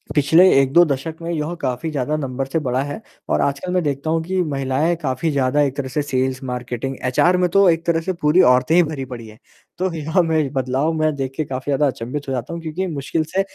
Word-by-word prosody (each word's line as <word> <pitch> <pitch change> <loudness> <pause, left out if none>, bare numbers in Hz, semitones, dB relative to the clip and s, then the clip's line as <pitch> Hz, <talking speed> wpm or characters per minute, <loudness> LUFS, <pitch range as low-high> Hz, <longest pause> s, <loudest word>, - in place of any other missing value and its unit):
पिछले 160 +6 +6
1-2 145 +6 +5
दशक 145 +2 -3
में 165 - -5
यह 160 +1 -2
काफ़ी 130 +4 -2
ज़्यादा 145 +1 -1
नंबर 135 -2 -3
से 160 +4 -1
बढ़ा 130 -2 -1
है, 145 +10 -6 0.3
और - - +2
आजकल 140 +6 -1
मैं 180 -2 +1
देखता 145 +1 -2
हूँ 165 0 +1
कि, 185 +2 -1
महिलाएँ 140 +3 0
काफ़ी 135 +3 -1
ज़्यादा 140 +1 +1
एक 140 -2 0
तरह 135 -2 -2
से 145 +4 -1
सेल्स-मार्केटिंग 130 -1 -3
एचआर 175 +8 +3
में 180 -1 +2
तो 195 +1 +4
एक 165 0 +1
तरह 165 -1 +1
से 185 +3 -2
पूरी 165 +2 +3
औरतें 130 +6 +2
ही 175 - +6
भरी 150 -4 -4
पड़ी 120 -3 -8
हैं। 110 +2 -15 0.4
तो 185 0 -1
यहाँ 160 +3 +1
में 155 -4 0
बदलाव 135 +4 0
मैं 155 -1 +1
देख 135 -1 -3
के 155 - -1
काफ़ी 130 +1 -5
ज़्यादा 145 +1 +2
अचंभित 135 +3 -5
हो 135 - -2
जाता 125 +5 -4
हूँ, 170 - -5
क्योंकि 165 +4 -3
मुश्किल 155 +1 -2
से 195 - +3
145 Hz, 230 wpm, -20 LUFS, 130-165 Hz, 0.4 s, पिछले